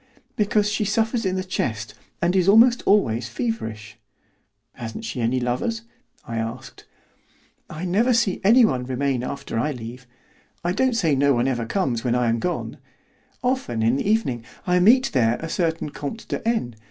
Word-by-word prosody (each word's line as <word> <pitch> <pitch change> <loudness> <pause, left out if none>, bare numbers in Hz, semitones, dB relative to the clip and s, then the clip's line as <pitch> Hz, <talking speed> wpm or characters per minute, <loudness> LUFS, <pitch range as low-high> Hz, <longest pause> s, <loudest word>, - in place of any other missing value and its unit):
"Because 210 0 +2
she 210 +1 0
suffers 225 +1 0
in 185 - -1
the 185 - -1
chest, 115 - -3 0.3
and 175 +2 +2
is 185 0 +3
almost 235 +4 +6
always 120 - +2
feverish." 110 - -4 0.7
"Hasn't 115 - -7
she 130 - -4
any 120 +3 +1
lovers?" 130 - -2 0.4
I 115 - -4
asked. 115 0 -6 0.8
"I 160 +4 -6
never 210 +8 +2
see 230 -5 +1
anyone 215 - +4
remain 130 0 -1
after 125 -3 -4
I 150 +5 0
leave; 125 +1 -9 0.6
I 175 - 0
don't 255 +5 +1
say 165 -9 +2
no 140 0 +3
one 120 +2 +1
ever 120 -3 -1
comes 125 - -1
when 120 -1 +1
I 125 -1 +2
am 115 0 +1
gone. 180 +8 -3 0.6
Often 245 - -1
in 115 +4 +3
the 195 - -1
evening 135 - 0 0.2
I 180 0 +3
meet 250 +8 +5
there 120 -3 +3
a 165 - -5
certain 165 -2 -1
Comte 150 +13 -6
de - - -4
N. 125 - -1
155 Hz, 170 wpm, -23 LUFS, -, 0.8 s, almost